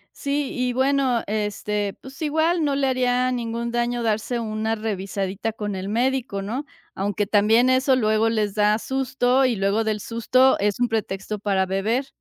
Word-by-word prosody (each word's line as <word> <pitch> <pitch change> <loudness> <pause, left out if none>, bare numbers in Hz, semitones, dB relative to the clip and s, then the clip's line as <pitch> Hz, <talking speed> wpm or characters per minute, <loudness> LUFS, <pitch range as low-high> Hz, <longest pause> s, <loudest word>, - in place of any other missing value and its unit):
Sí, 280 0 -2
y 250 -1 -1
bueno, 260 -2 +1
este, 210 -1 -2
pues 265 +2 -12
igual 315 +2 +1
no 285 -1 +1
le 275 -1 +1
haría 255 0 +1
ningún 235 -1 -3
daño 240 0 -1
darse 225 +2 -1
una 220 0 -2
revisadita 200 0 -3
con 210 -2 -4
el 190 +1 -5
médico, 245 -2 0
¿no?, 240 +9 -4 0.3
aunque 205 +2 -1
también 220 +5 +4
eso 260 +1 +3
luego 220 -2 +2
les 215 -3 0
da 210 0 +3
susto 265 +1 +1
y 250 -2 +1
luego 200 +3 +1
del 215 -1 -1
susto 255 +4 +2
es 205 0 +1
un 245 - +2
pretexto 210 -1 -3
para 195 -2 +1
beber. 215 +8 -1
225 Hz, 165 wpm, -23 LUFS, 210-255 Hz, 0.3 s, también